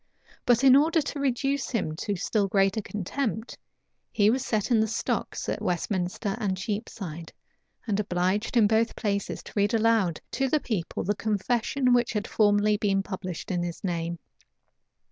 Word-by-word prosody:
But 245 Hz, +1 st, +4 dB
in 265 Hz, -1 st, +8 dB
order 320 Hz, +4 st, +4 dB
to 290 Hz, -1 st, -3 dB
reduce 275 Hz, +1 st, 0 dB
him 185 Hz, -10 st, -1 dB
to 205 Hz, -, -2 dB
still 200 Hz, +3 st, 0 dB
greater 195 Hz, +2 st, +2 dB
contempt, 220 Hz, +3 st, -3 dB, 0.6 s
he 210 Hz, 0 st, +4 dB
was 260 Hz, +2 st, 0 dB
set 215 Hz, -1 st, -1 dB
in 230 Hz, -, +5 dB
the 220 Hz, -, +2 dB
stocks 220 Hz, -, -2 dB
at -, -, -2 dB
Westminster 180 Hz, +3 st, -1 dB
and 195 Hz, -4 st, -1 dB
Cheapside, 190 Hz, -5 st, -5 dB, 0.5 s
and 210 Hz, -3 st, 0 dB
obliged 195 Hz, +4 st, 0 dB
in 225 Hz, -, +6 dB
both 225 Hz, +2 st, +2 dB
places 200 Hz, -3 st, -2 dB
to -, -, -12 dB
read 205 Hz, +2 st, +2 dB
aloud 220 Hz, -7 st, +2 dB
to 270 Hz, -1 st, 0 dB
the 305 Hz, -, +2 dB
people 205 Hz, -, -3 dB
the 205 Hz, -, +1 dB
confession 235 Hz, +5 st, +1 dB
which 240 Hz, -2 st, +2 dB
had 210 Hz, -2 st, -2 dB
formerly 210 Hz, 0 st, +3 dB
been 195 Hz, -2 st, +1 dB
published 185 Hz, -3 st, -5 dB
in 175 Hz, -1 st, 0 dB
his 175 Hz, -1 st, -5 dB
name. 170 Hz, -2 st, -2 dB
210 Hz, 165 wpm, -27 LUFS, 190-235 Hz, 0.6 s, in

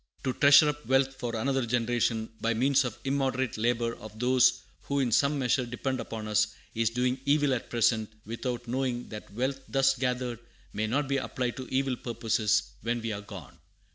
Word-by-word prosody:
"To 130 Hz, -, 0 dB
treasure 145 Hz, +3 st, +7 dB
up 150 Hz, 0 st, -4 dB
wealth 135 Hz, 0 st, +3 dB
for 120 Hz, -3 st, -4 dB
another 135 Hz, +3 st, 0 dB
generation, 115 Hz, -1 st, 0 dB
by 115 Hz, 0 st, +1 dB
means 135 Hz, +3 st, +3 dB
of 120 Hz, -, -3 dB
the 135 Hz, -, -2 dB
immoderate 130 Hz, -3 st, 0 dB
labor 115 Hz, +1 st, 0 dB
of 110 Hz, 0 st, -11 dB
those 125 Hz, +1 st, +3 dB, 0.2 s
who 140 Hz, 0 st, 0 dB
in 125 Hz, -3 st, +1 dB
some 140 Hz, +5 st, +3 dB
measure 130 Hz, -1 st, +1 dB
depend 125 Hz, +2 st, -3 dB
upon 110 Hz, -1 st, -5 dB
us, 105 Hz, 0 st, +1 dB, 0.2 s
is 115 Hz, -1 st, +1 dB
doing 125 Hz, +2 st, 0 dB
evil 145 Hz, 0 st, +3 dB
at 125 Hz, -, -3 dB
present, 115 Hz, -2 st, +1 dB
without 120 Hz, +2 st, -4 dB
knowing 125 Hz, 0 st, -2 dB
that 105 Hz, -2 st, -9 dB
wealth 130 Hz, +5 st, -2 dB
thus 135 Hz, 0 st, +3 dB
gathered 125 Hz, -2 st, -2 dB, 0.3 s
may 110 Hz, +1 st, -1 dB
not 140 Hz, +5 st, 0 dB
be 140 Hz, 0 st, +1 dB
applied 125 Hz, -2 st, -2 dB
to 130 Hz, -, -6 dB
evil 130 Hz, -1 st, 0 dB
purposes 110 Hz, -3 st, 0 dB, 0.2 s
when 120 Hz, +2 st, -1 dB
we 115 Hz, -1 st, -3 dB
are 100 Hz, -1 st, -4 dB
gone. 85 Hz, -, -11 dB
125 Hz, 190 wpm, -28 LUFS, 115-135 Hz, 0.3 s, treasure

